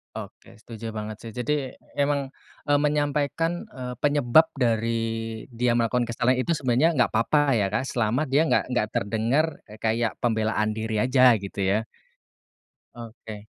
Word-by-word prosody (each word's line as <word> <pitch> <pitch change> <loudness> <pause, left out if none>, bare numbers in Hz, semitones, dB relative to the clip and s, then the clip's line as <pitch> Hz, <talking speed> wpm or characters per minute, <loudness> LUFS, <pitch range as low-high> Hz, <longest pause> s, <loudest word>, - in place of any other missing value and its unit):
Oke - - -10
setuju 115 0 -8
banget 110 0 -5
sih, 115 - -7
jadi 130 +3 -3 0.2
emang, 140 -1 0 0.4
eee, 145 - +4
menyampaikan, 150 +3 0
eee, 125 -1 -6
penyebab 145 0 +5 0.2
dari 115 -2 +1 0.6
dia 120 +1 +1
melakukan 120 +1 +1
kesalahan 120 +2 +1
itu 170 - -1
sebenarnya 140 0 +2
gak 120 - +2
apa-apa 140 +4 +3
ya, 100 -3 +1
Kak, 110 +6 -1
selama 120 +6 0
dia 140 +4 +3
gak 165 - +1
gak 110 - +1
terdengar 115 +9 +1 0.3
kayak 115 +1 -1
pembelaan 110 -2 0
diri 110 -1 -2
aja 125 +2 +5
gitu 100 +1 -8
ya. 105 +4 +1 1.1
Oke. 110 -3 -10
120 Hz, 140 wpm, -25 LUFS, 110-140 Hz, 1.1 s, penyebab